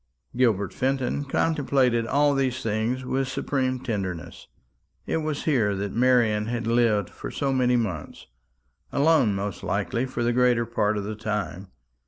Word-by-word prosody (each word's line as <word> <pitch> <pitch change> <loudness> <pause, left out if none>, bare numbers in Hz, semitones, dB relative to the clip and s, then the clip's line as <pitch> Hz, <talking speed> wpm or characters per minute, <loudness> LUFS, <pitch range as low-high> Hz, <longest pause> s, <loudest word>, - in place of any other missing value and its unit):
Gilbert 110 -6 +1
Fenton 135 +1 -1
contemplated 135 -6 +1
all 145 +2 +3
these 130 -2 -1
things 115 +4 -1
with 135 +1 -1
supreme 130 -1 -1
tenderness. 95 -9 -5 0.6
It - - -1
was 155 -2 -3
here 115 -10 +2
that 100 +1 -3
Marian 115 -4 +3
had 120 0 -2
lived 115 -4 +2
for - - -7
so 135 -1 -1
many 125 -1 +2
months 100 -10 -3 0.7
alone 140 -8 +3
most 100 0 -4
likely 125 +3 -1
for 130 -2 -3
the 120 0 +1
greater 125 -1 +3
part 110 -2 0
of 100 - -2
the 105 +2 -4
time. 105 -3 -4
120 Hz, 150 wpm, -25 LUFS, 105-130 Hz, 0.7 s, all